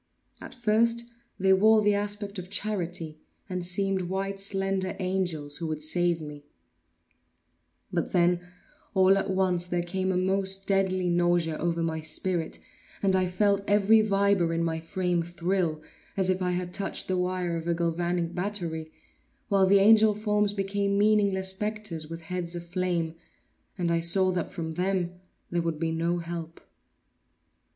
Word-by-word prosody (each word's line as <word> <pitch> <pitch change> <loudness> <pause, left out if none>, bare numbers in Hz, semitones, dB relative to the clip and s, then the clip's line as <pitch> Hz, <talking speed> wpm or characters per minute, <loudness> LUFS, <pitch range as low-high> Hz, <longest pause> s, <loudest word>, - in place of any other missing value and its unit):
At - - -9
first 235 0 +2 0.3
they 190 0 +4
wore 215 +3 +5
the 210 0 +4
aspect 205 0 -2
of 180 0 -8
charity, 175 -6 -3 0.3
and 180 -2 -3
seemed 185 0 0
white 195 +1 -1
and 195 - -10
slender 195 -1 -1
angels 180 -6 -2
who 165 - -4
would 155 -1 -4
save 175 +1 +1
me; 150 -1 -9 1.5
but - - -1
then, 175 0 +3 0.5
all 190 0 +6
at 195 0 -1
once, 185 -2 +1
there 175 -1 -1
came 185 +2 -1
a 180 - 0
most 195 +1 +1
deadly 190 -2 +1
nausea 175 -2 +2
over 170 0 0
my 160 -1 -1
spirit, 160 +2 -1 0.5
and 190 -1 +3
I 185 -1 +2
felt 200 +2 +2
every 205 +2 +5
fibre 200 -4 +2
in 165 - 0
my 160 -1 -1
frame 180 +1 -1
thrill 170 -2 -1 0.3
as 190 -1 +2
if 185 0 -2
I 180 -1 0
had 180 0 -3
touched 200 - -2
the 185 - 0
wire 180 -1 -1
of 165 0 -4
a 170 - +1
galvanic 170 0 -1
battery, 175 -4 -3 0.6
while 195 -2 +4
the 200 +1 +6
angel 215 +1 +6
forms 210 -1 +1
became 200 0 -1
meaningless 200 -2 +3
spectres, 210 -5 -3
with 165 +1 -7
heads 175 +1 -4
of 175 0 -6
flame, 175 -2 -1 0.6
and 175 -2 0
I 170 - +2
saw 185 +3 +2
that 180 -3 -2
from 165 -4 -5
them 180 +1 -1 0.3
there 175 -1 +1
would 165 -2 -2
be 165 -1 0
no 165 +2 0
help. 170 -1 -6
185 Hz, 160 wpm, -27 LUFS, 170-195 Hz, 1.5 s, all